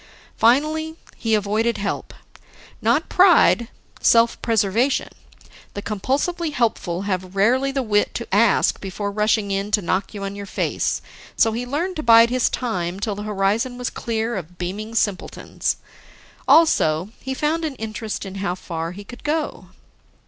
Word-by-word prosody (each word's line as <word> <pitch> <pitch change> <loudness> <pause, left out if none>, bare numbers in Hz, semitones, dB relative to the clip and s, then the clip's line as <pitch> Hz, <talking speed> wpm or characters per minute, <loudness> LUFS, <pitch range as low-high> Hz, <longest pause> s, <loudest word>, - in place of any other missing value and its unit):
Finally, 310 +7 +2 0.2
he 225 -1 0
avoided 215 +3 0
help. 200 0 -3 0.7
Not 240 +9 +2
pride, 350 -10 +5 0.3
self 230 0 +4
preservation; 225 +4 +1 0.7
the 205 - -5
compulsively 290 - -1
helpful 195 -7 -1
have 185 -1 -3
rarely 255 +7 +2
the 270 -1 -1
wit 210 -2 +1
to 235 - -4
ask 210 +1 +3
before 200 +1 -4
rushing 210 0 +1
in 195 +1 -1
to 210 - +3
knock 190 +4 -1
you 200 - -5
on 195 0 -4
your 200 0 -7
face, - - -1 0.3
so 225 - +3
he 240 +3 -4
learned 335 +8 -2
to - - -2
bide 230 -1 +6
his 255 -1 +2
time 185 -7 -3
till 210 +1 -2
the 200 - -6
horizon 210 +5 0
was 250 -1 -3
clear 230 0 -2
of 175 0 -8
beaming 205 +6 -5
simpletons. 205 -4 -1 0.7
Also, 180 - +4
he 265 0 -4
found 310 +4 0
an 305 -4 -3
interest 215 -2 -5
in 190 - -7
how 180 -3 -1
far 165 -2 -5
he 205 +2 -9
could 245 +4 -12
go. 305 0 -2
220 Hz, 155 wpm, -22 LUFS, 200-250 Hz, 0.7 s, bide